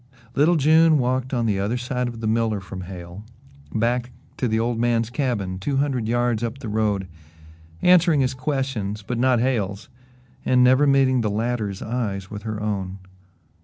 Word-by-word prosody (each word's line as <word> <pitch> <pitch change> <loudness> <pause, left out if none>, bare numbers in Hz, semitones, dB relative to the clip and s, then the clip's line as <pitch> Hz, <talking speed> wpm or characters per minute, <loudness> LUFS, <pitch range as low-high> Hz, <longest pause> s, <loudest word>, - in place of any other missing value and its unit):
Little 155 +5 +4
June 160 +1 +5
walked 130 0 0
on 120 -3 0
the 100 -3 0
other 105 +5 -1
side 125 0 -2
of 115 -1 -7
the - - -3
miller 110 -1 +1
from 95 0 -8
Hale 90 +1 -9 0.5
back 120 +2 0 0.3
to 125 - 0
the 110 0 +1
old 115 0 -1
man's 115 -1 +1
cabin, 110 -10 -2
two 135 +8 -1
hundred 135 -5 0
yards 120 -1 +1
up 115 +2 -3
the 130 -5 -7
road, 105 -3 0 0.8
answering 170 -4 +5
his 130 0 +1
questions 130 -7 -3
but 120 +4 -3
not 125 -1 +3
Hale's 110 -3 -1 0.5
and 125 -1 +4
never 130 +3 +5
meeting 135 -2 +3
the 110 - 0
latter's 105 -2 -2
eyes 105 -5 -3
with 105 -1 -6
her 110 -1 -4
own. 100 -3 -3
120 Hz, 170 wpm, -23 LUFS, 105-130 Hz, 0.8 s, June